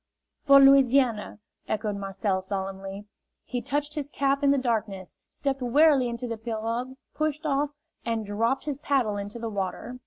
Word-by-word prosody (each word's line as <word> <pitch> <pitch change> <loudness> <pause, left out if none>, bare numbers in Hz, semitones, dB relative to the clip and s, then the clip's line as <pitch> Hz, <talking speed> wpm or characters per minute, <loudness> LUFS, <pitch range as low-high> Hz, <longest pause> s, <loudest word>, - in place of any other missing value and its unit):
"For 275 0 +9
Louisiana!" 265 -6 +4 0.3
echoed 215 -1 -2
Marcel, 195 -1 -2
solemnly. 195 +1 -5 0.4
He 245 -1 -4
touched 290 +2 -2
his 290 -2 -4
cap 275 0 0
in 280 - +5
the 280 - +4
darkness, 220 -7 -2
stepped 275 -1 -3
warily 270 0 +4
into 235 +1 -4
the 230 -1 -4
pirogue, 230 +3 -3 0.2
pushed 310 0 -2
off, 290 0 +1 0.3
and 225 -2 -2
dropped 225 +6 -1
his 285 -2 -3
paddle 260 -8 +1
into 205 +3 -6
the 230 0 -4
water. 205 +4 -4
240 Hz, 155 wpm, -26 LUFS, 210-275 Hz, 0.4 s, For